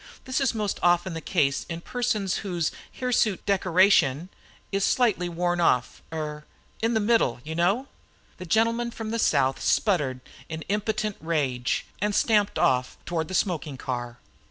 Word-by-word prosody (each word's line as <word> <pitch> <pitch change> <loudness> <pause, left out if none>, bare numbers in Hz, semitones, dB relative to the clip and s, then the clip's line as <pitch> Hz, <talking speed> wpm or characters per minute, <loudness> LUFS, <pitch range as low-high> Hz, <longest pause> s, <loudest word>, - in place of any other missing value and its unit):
This 260 +1 -1
is 265 -4 +1
most 210 -3 -2
often 175 +1 +2
the 165 - -5
case 140 -6 +1
in 165 -1 -4
persons 215 -4 -1
whose 175 -5 -2 0.2
hirsute 240 -6 0
decoration 185 -5 +3 0.4
is 195 -1 0
slightly 210 -9 +2
worn 175 +1 0
off 125 -7 +1
er, 150 -2 -4 0.4
in 225 +1 +1
the - - +3
middle, 215 - +2
you 155 - -5
know." 195 +11 +1 0.5
The 180 - -8
gentleman 230 +5 +2
from 225 -2 -6
the 230 - -1
South 130 -9 +2
sputtered 145 - +1 0.3
in 160 -1 -5
impotent 215 +1 -1
rage 135 -7 -1 0.2
and 210 0 0
stamped 210 -3 +2
off 125 -1 +1
toward 165 -2 -2
the 185 - -4
smoking 160 -8 -1
car. 120 -2 -4
180 Hz, 155 wpm, -26 LUFS, 155-215 Hz, 0.5 s, decoration